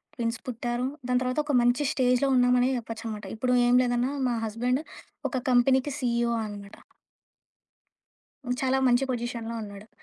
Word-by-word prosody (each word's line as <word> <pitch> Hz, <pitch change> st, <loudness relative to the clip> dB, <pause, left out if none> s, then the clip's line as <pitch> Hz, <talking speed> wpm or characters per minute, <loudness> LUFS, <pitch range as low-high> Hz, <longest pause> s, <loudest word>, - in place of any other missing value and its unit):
Twins 230 Hz, -1 st, -2 dB
పుట్టారు. 240 Hz, 0 st, -3 dB, 0.2 s
దాని 250 Hz, 0 st, +2 dB
తర్వాత 255 Hz, +3 st, -1 dB
ఒక 295 Hz, -, -1 dB
మంచి 245 Hz, +4 st, +2 dB
స్టేజ్‌లో 250 Hz, 0 st, +2 dB
ఉన్నామనే 250 Hz, 0 st, +4 dB
జెప్పొచ్చనమాట. 225 Hz, -2 st, -6 dB
ఇప్పుడు 250 Hz, +2 st, +1 dB
ఏం 245 Hz, -, +3 dB
లేదన్నా 245 Hz, +1 st, 0 dB, 0.2 s
మా 240 Hz, -, 0 dB
హస్బెండ్ 245 Hz, +5 st, -1 dB, 0.5 s
ఒక 260 Hz, -, -2 dB
కంపెనీకి 260 Hz, +3 st, +3 dB
సీఈఓ 235 Hz, -2 st, 0 dB
అనమాట. 205 Hz, -1 st, -9 dB, 1.9 s
చాలా 265 Hz, 0 st, +2 dB
మంచి 245 Hz, +1 st, +3 dB
పొజిషన్‌లో 235 Hz, -1 st, -4 dB
ఉన్నాడు. 200 Hz, 0 st, -10 dB
245 Hz, 130 wpm, -27 LUFS, 230-255 Hz, 1.9 s, ఉన్నామనే